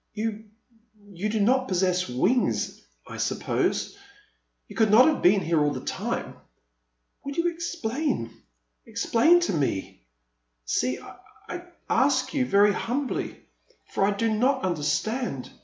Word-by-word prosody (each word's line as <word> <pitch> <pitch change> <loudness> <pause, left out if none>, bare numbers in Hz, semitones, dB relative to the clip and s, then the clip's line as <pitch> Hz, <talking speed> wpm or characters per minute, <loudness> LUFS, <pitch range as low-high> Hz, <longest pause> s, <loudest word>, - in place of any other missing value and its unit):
You 220 0 -3 0.3
— 215 -2 -24
you 190 +5 -2
do 220 0 -1
not 255 +5 +3
possess 185 -1 +1
wings, 195 - 0 0.3
I - - -8
suppose. - - -1 0.7
You - - -12
could 220 -2 +3
not 225 +5 +7
have 310 -3 +1
been 195 +2 +5
here 165 -2 +1
all 145 - +2
the - - -4
time. - - -3 0.9
Will 280 - -5
you 335 +3 +1
explain 295 - -2 0.3
— - - -50
explain 325 +10 +3
to 345 - 0
me? 130 - -2 0.6
See, 125 - 0 0.5
I 355 0 -6 0.2
ask 260 +3 +2
you 265 -4 +1
very 205 0 +5
humbly, 260 +6 -3 0.5
for - - 0
I 195 - +4
do 220 +2 0
not 260 +5 +1
understand. 180 - -1
220 Hz, 140 wpm, -26 LUFS, 185-260 Hz, 0.9 s, not